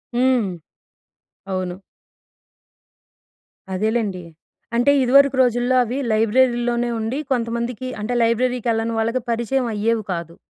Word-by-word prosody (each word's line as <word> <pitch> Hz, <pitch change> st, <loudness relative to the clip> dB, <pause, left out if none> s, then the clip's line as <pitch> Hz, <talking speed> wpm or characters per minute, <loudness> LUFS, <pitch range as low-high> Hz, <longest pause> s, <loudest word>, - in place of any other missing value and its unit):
హ్మ్. 250 Hz, -4 st, +2 dB, 1.0 s
అవును. 185 Hz, 0 st, -3 dB, 1.9 s
అదేలేండి. 210 Hz, -2 st, -1 dB, 0.5 s
అంటే 245 Hz, +4 st, +4 dB
ఇదివరకు 275 Hz, +2 st, +5 dB
రోజుల్లో 245 Hz, +1 st, +1 dB
అవి 245 Hz, +2 st, -4 dB
లైబ్రరీలోనే 240 Hz, +2 st, +2 dB
ఉండి 225 Hz, +4 st, -2 dB
కొంతమందికి 235 Hz, 0 st, -2 dB
అంటే 215 Hz, +4 st, -3 dB
లైబ్రరీకెళ్ళని 230 Hz, -1 st, 0 dB
వాళ్ళకి 230 Hz, +3 st, 0 dB
పరిచయం 240 Hz, +3 st, 0 dB
అయ్యేవి 220 Hz, +1 st, 0 dB
కాదు. 170 Hz, -1 st, -6 dB
235 Hz, 90 wpm, -21 LUFS, 220-250 Hz, 1.9 s, ఇదివరకు